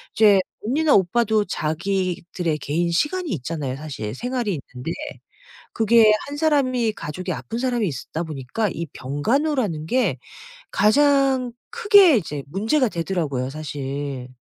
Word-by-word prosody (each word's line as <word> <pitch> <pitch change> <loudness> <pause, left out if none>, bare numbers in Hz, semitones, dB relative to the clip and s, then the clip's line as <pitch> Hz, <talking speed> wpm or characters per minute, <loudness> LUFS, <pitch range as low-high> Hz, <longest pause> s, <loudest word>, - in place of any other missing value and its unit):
이제 210 -3 +6 0.3
언니나 295 +6 +3
오빠도 215 +3 +2
자기들의 175 0 -2
개인 170 +5 -1
시간이 320 - 0
있잖아요. 140 -3 -3
사실 130 -8 -6
생활이 240 - -2
있는데 125 +6 -5 0.8
그게 225 -1 +5
1 285 +1 -6
사람이 260 -7 +2
가족이 185 -2 -5
아픈 230 - -6
사람이 245 -4 0
있다 150 +2 -5
보니까 155 - -3
이 170 - -4
병간호라는 200 - -1
게 215 - +1 0.5
가장 270 +2 +3 0.2
크게 410 - +6
이제 150 -7 -4
문제가 225 - +1
되더라고요 165 -8 -2
사실. 140 -3 -5
195 Hz, 290 characters per minute, -22 LUFS, 150-255 Hz, 0.8 s, 이제